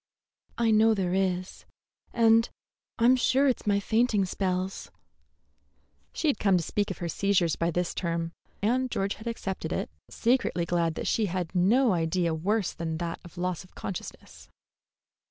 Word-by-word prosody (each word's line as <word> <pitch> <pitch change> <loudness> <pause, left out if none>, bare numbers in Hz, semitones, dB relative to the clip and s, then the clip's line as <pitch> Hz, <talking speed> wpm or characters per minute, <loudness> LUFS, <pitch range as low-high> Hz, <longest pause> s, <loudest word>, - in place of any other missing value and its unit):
"I 230 -1 +2
know 220 +1 +5
there 185 -3 -1
is; 185 -1 -1 0.5
and 230 0 +4 0.5
I'm 245 +2 +5
sure 265 +2 +3
it's 250 -4 -1
my 200 -1 +3
fainting 220 -1 +2
spells." 185 0 -2 1.2
She 320 - -2
had 280 -8 +1
come 195 -3 +3
to 170 - -1
speak 205 +5 -1
of 190 - -5
her 175 - -4
seizures 180 -2 +1
by 170 - 0
this 175 +1 -1
term, 165 -2 -2 0.3
and 255 +4 +1
George 195 -3 -1
had 220 - -10
accepted 200 -5 -4
it, - - -2 0.2
secretly 230 -8 +1
glad 170 -2 0
that - - -4
she 220 -2 +1
had 180 -2 -3
no 215 +6 +3
idea 170 0 0
worse 195 +5 0
than 160 -1 -4
that 170 0 -4
of 175 -1 -14
loss 180 0 -2
of 185 - -21
consciousness. 185 - -8
190 Hz, 160 wpm, -28 LUFS, 175-225 Hz, 1.2 s, know